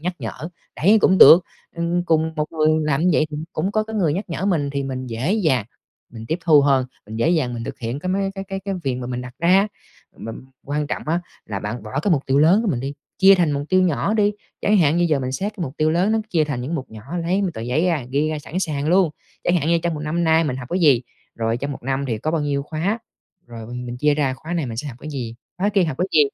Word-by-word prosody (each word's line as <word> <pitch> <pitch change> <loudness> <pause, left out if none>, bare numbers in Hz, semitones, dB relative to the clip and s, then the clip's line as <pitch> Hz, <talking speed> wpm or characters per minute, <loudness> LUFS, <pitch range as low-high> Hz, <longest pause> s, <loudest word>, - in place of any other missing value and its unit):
nhắc 180 +3 -2
nhở, 160 - -6 0.3
đấy, 205 +7 +5
cũng 190 -1 +4
được. 170 +2 +9 0.3
Ừm, 170 +1 0
cùng 160 -1 +1
một 150 0 -2
người 155 -1 +2 0.2
làm 150 -2 +1
như 180 - +4
vậy 155 - +3
thì 150 - -5 0.2
cũng 185 +6 -1
có 215 - +2
cái 220 0 -6
người 170 -8 +2
nhắc 195 +6 -2
nhở 165 - -3
mình, 155 -8 +1
thì 140 0 -2
mình 130 -1 -4
dễ 120 - -1
dàng, 155 - +2 0.5
mình 115 -1 -9
tiếp 160 - -1
thu 155 -4 +6
hơn. 135 -2 +3 0.2
Mình 110 +1 -7
dễ 115 - +1
dàng 130 -8 +1
mình 115 - -5
thực - - -7
hiện 120 +3 -4
cái 185 - -5
mấy 195 +1 0
cái 195 -1 -5
cái 195 0 -5
cái 195 0 -3
việc 135 -2 0
mà 125 -1 -5
mình 125 0 -3
đặt 125 0 -9
ra. 185 +4 +4 0.5
Mà 115 - -7 0.3
quan 145 +1 -2
trọng - - -3
á 170 +2 +1 0.3
là 100 -2 -3
bạn 105 +4 -5
bỏ 110 +5 -3
cái 195 - 0
mục 145 -4 +2
tiêu 135 +1 +2
lớn 175 +9 +5
của 220 - -1
mình 125 -7 -1
đi, 135 +2 -4 0.2
chia 195 +1 +8
thành 175 -5 +2
mục 140 0 -1
tiêu 185 0 +4
nhỏ 185 +4 +1
đi. 210 -1 +3 0.3
Chẳng 210 - +3
hạn 160 -2 +3
như 175 - +3
giờ 150 -3 +2
mình 130 0 -3
xét 200 +10 -2
cái 180 - -4
mục 135 0 -8
tiêu 155 0 +2
lớn 180 +6 +2
nó 225 - +2
chia 160 -5 +2
thành 140 -5 -3
những 145 +7 -3
mục 135 -4 -5
nhỏ, 110 -1 -10 0.2
lấy 185 +4 +1
một 190 - +1
tờ 110 - -6
giấy 125 +9 0
ra, 160 -7 0
ghi 145 +3 +1
ra 155 - -2
sẵn 160 +4 -5
sàng 150 -4 -2
luôn. 180 -2 +4 0.3
Chẳng 175 - +3
hạn 155 -2 0
như 170 0 +4
trong 170 -2 0
một 150 - -5
năm 165 +3 -1
nay 160 0 +4
mình 130 -4 -2
học 125 -2 -8
cái 180 - 0
gì? 140 -7 +5 0.3
Rồi 115 0 -1
trong 140 +3 -4
một - - -9
năm 135 +2 -1
thì 115 -4 -2
có 155 - -2
bao 165 -1 0
nhiêu 140 -1 -1
khóa? 165 +9 -2 0.5
Rồi 115 -2 -9
mình 125 +1 -6
mình 120 0 -5
chia 150 +3 +2
ra 140 -3 0
khóa 160 +5 -8
này 165 -5 -1
mình 115 -2 -6
sẽ 145 +5 -4
học 120 - -9
cái 155 - -7
gì, 120 -5 -5 0.2
khóa 200 - +1
kia 195 -3 +2
học 155 -5 -3
cái 180 - +1
gì? 155 - +6
155 Hz, 290 wpm, -21 LUFS, 130-175 Hz, 0.5 s, được